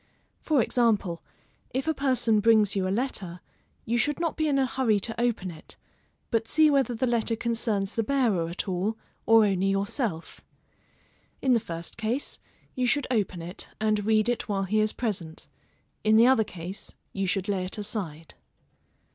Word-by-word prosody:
For 290 -7 +2
example, 210 -9 +1 0.5
if 265 +3 -1
a 320 - +2
person 255 -6 +2
brings 215 -2 +4
you 190 -1 0
a - - -1
letter, 190 -9 -4 0.5
you 235 +2 0
should 295 +4 0
not 335 -2 -1
be 315 -1 0
in 285 -2 +2
a 270 - +3
hurry 235 -4 +1
to 225 +3 -4
open 225 -7 -1
it, 160 -1 -11 0.5
but 225 -1 0
see 310 -1 +4
whether 270 -4 +2
the 255 - 0
letter 235 -1 +1
concerns 220 -4 -1
the 230 - 0
bearer 225 -9 +1
at 175 +4 -4
all, 190 +4 -1 0.3
or 225 -1 +7
only 195 -1 +1
yourself. 195 - -2 1.0
In 260 -2 +2
the 235 - +4
first 170 -4 -7
case, 230 +5 -3 0.3
you 255 -1 0
should 290 +2 +1
open 190 -7 -1
it, 175 +2 -5
and 215 -1 +1
read 215 +1 +3
it 240 -2 -1
while 195 -1 0
he 210 +3 +1
is 215 0 +2
present; 180 -9 -4 0.6
in 215 0 +4
the 225 +2 +7
other 255 -3 +5
case, 185 +2 -8 0.2
you 195 -1 -1
should 190 +1 -1
lay 195 -3 0
it 185 - -3
aside. 195 -7 -4
220 Hz, 175 wpm, -27 LUFS, 195-245 Hz, 1.0 s, or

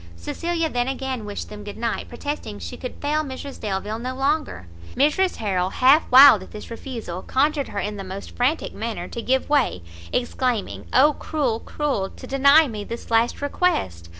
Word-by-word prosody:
Cecilia 330 - -2
then 245 -4 -1
again 265 -4 -3
wished 205 -1 -6
them 210 0 -9
good 205 0 -8
night, 230 0 -3
protesting 285 - -5
she 85 -3 -7
could 250 - -7
fail 300 +2 -1
Mrs 275 0 -7
Delvile 210 +1 -3
no 255 +2 -4
longer. 280 - -1 0.3
Mrs 305 +7 +2
Harrel, 190 -4 -1
half 265 +9 +4
wild 260 -5 +9
at 185 - -11
this 210 - -10
refusal, 230 -7 -6
conjured 285 +4 +1
her - - -8
in 210 0 -2
the 195 - -5
most 190 +1 -8
frantic 260 +6 0
manner, 220 -6 -4
to 235 - -6
give 260 +2 +1
way, 275 - +1 0.3
exclaiming, 245 -3 -1
"Oh 290 +4 +5
cruel! 275 -8 -1
cruel! 265 -12 -2
to - - -12
deny 280 +3 +5
me 215 -4 -5
this 235 +2 -8
last 230 +4 +2
request! 95 - -1
250 Hz, 175 wpm, -23 LUFS, 210-285 Hz, 0.3 s, wild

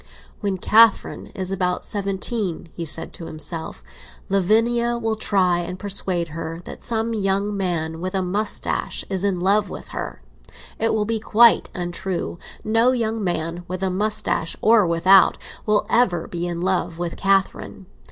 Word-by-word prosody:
"When 200 -3 -2
Catherine 220 +3 +4
is 190 -1 -4
about 180 -2 -1
seventeen," 195 -3 -2
he 170 - -5
said 160 +1 0
to 165 - -9
himself, 155 - -4 0.5
"Lavinia 230 +5 +2
will 225 -1 -1
try 185 -5 +1
and 180 +1 -5
persuade 185 -4 0
her 165 +1 -6
that - - -8
some 230 0 -1
young 200 0 0
man 165 -4 -2
with 185 +2 -3
a 190 - +1
moustache 205 +4 -2
is 190 -1 0
in 195 -3 0
love 200 +1 +2
with - - -9
her. - - -6 0.6
It 225 0 +1
will 210 -1 0
be 225 +1 -1
quite 230 +1 +5
untrue; 175 -1 -4 0.2
no 225 +4 +3
young 225 -3 -1
man, 170 -1 -2
with 185 +1 -4
a 190 - +1
moustache 195 -4 0
or 220 -4 +4
without, 185 +3 +5 0.3
will 210 0 +2
ever 185 -9 +2
be 175 0 -4
in 170 -1 -4
love 180 -2 -1
with 175 -1 -4
Catherine. 195 0 0
190 Hz, 155 wpm, -22 LUFS, 175-215 Hz, 0.6 s, quite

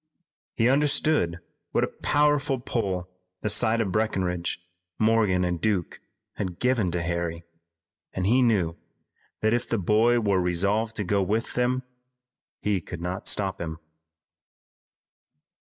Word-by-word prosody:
He 115 - +3
understood 140 - +2 0.3
what - - +2
a - - +1
powerful 145 -2 +2
pull 95 -7 -2 0.3
the 105 - +1
sight 110 +2 +4
of 100 -4 -1
Breckinridge, 90 -5 -1 0.4
Morgan 110 -5 +3
and 90 -1 -2
Duke 100 -6 -1 0.4
had 90 -4 -3
given 125 -7 +1
to 85 0 -2
Harry, 85 -1 -2 0.7
and 90 - -3
he 120 +6 +4
knew 100 -9 +2 0.7
that 110 +1 +2
if 120 - -1
the 115 - +1
boy 110 +5 +3
were 100 -4 +2
resolved 100 +6 +1
to 105 - -2
go 100 +1 +1
with 110 +5 -1
them 125 +1 0 0.7
he 100 -3 -1
could 85 +1 -8
not 90 +2 -4
stop 95 -2 0
him. 80 -1 -4
105 Hz, 135 wpm, -26 LUFS, 90-115 Hz, 0.7 s, sight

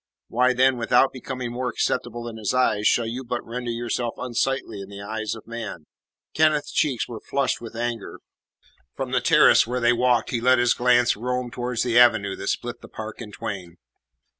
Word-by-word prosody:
Why, 125 +2 +3
then, 130 +1 +3
without 125 +3 +3
becoming 130 -1 -5
more 125 +1 -2
acceptable 120 -1 -2
in 115 -1 -7
His 110 +2 -2
eyes, 105 -5 +2
shall 120 - +3
you 120 +4 -4
but 120 -1 -4
render 120 +1 -5
yourself 120 0 -2
unsightly 125 -3 -2
in 95 - -9
the 100 0 -9
eyes 110 +1 -3
of 110 - -12
man?" 115 -9 -7 0.5
Kenneth's 155 -2 +2
cheeks 140 -7 0
were 115 -2 -7
flushed 140 -3 -1
with 115 -1 -9
anger. 120 -2 -4 0.8
From - - -4
the - - +1
terrace - - +5
where 125 +1 -2
they 120 0 +4
walked 120 -1 +2
he 120 -2 -1
let 130 +1 +5
his 120 0 +3
glance 120 -1 +3
roam 125 +2 -3
towards 125 -1 -2
the 120 -1 +3
avenue 110 -5 +4
that - - -6
split 120 0 -3
the - - -11
park 110 +1 -8
in 105 -3 -8
twain. 90 -4 -6
120 Hz, 190 wpm, -24 LUFS, 115-125 Hz, 0.8 s, terrace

